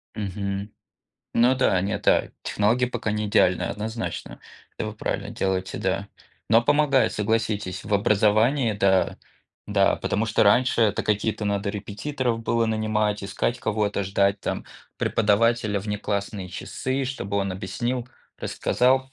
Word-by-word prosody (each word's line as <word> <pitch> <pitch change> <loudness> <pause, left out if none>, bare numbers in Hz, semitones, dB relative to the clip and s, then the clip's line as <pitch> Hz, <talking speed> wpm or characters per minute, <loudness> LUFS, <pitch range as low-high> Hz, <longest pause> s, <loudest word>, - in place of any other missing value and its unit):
Мгм. 100 0 -4 0.6
Ну 125 +3 +5
да, 110 -8 +3
нет, 100 +1 -3
а, - - +3
технологии 115 +5 +1
пока 120 -3 -3
не 105 0 -1
идеальны, 90 -3 +3
однозначно. 110 - -4 0.4
Это - - -3
вы - - -5
правильно - - -3
делаете, 95 -1 -2
да. 95 +1 -1 0.4
Но 115 +2 +5
помогает, 140 -4 +3
согласитесь, 105 -3 -1
в 105 - -5
образовании, 110 +4 +3
да. 95 -2 +2 0.5
Да, - - +3
потому 105 +3 -1
что 110 - +2
раньше 120 +4 +4
это 110 -3 +2
какие-то 105 0 0
надо 100 0 -1
репетиторов 115 +4 -3
было 115 0 +1
нанимать, 110 -1 0
искать 100 +4 -1
кого-то, 105 -1 0
ждать 100 +1 +1
там - - -3 0.3
преподавателя 110 0 +2
в 105 - -10
неклассные 100 -2 -3
часы, 130 +8 -3
чтобы 100 -6 -3
он 100 -1 0
объяснил, 120 +7 -3 0.3
рассказал. 130 +1 +1
105 Hz, 135 wpm, -24 LUFS, 100-115 Hz, 0.6 s, Ну